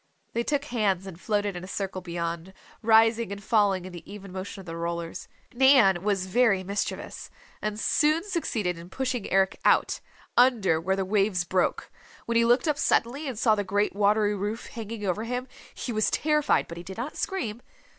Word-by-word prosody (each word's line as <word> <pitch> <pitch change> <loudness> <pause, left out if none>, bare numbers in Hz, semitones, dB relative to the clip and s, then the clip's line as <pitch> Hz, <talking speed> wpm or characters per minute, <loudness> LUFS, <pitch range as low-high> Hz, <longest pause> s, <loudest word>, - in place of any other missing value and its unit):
They 235 - 0
took 285 +3 -1
hands 205 -8 0
and 185 -2 -10
floated 205 -2 0
in 175 - -6
a - - -7
circle 195 -1 -4
beyond, 170 0 -4 0.3
rising 225 -1 +4
and 200 0 -6
falling 205 -5 +2
in 185 - -9
the 175 +2 -10
even 200 -2 -9
motion 190 +2 -6
of 190 - -10
the 165 -1 -6
rollers. 170 0 -4 0.3
Nan 245 -8 +5
was 195 -2 0
very 195 -1 +3
mischievous, 200 +2 -4 0.3
and 210 0 -3
soon 310 +7 +2
succeeded 225 - -2
in 170 +1 -11
pushing 255 0 -3
Eric 190 0 +2
out, - - +3 0.4
under 225 -10 +4
where 190 +3 0
the 195 -1 -1
waves 195 -2 +1
broke. 180 +1 -1 0.3
When 235 - -2
he 230 0 +5
looked 245 +7 +3
up 295 -1 +1
suddenly 275 +6 +1
and 255 -5 -4
saw 220 -1 +4
the 205 -1 0
great 205 +1 0
watery 210 +1 +3
roof 205 +3 -3
hanging 225 -2 -6
over 195 +3 -1
him, 250 +2 -3 0.3
he 245 - -4
was 215 0 +2
terrified 300 -1 +2
but 170 - -8
he 170 - -7
did 190 +3 -9
not 250 +6 -4
scream. 240 - -3
205 Hz, 190 wpm, -27 LUFS, 185-235 Hz, 0.4 s, Nan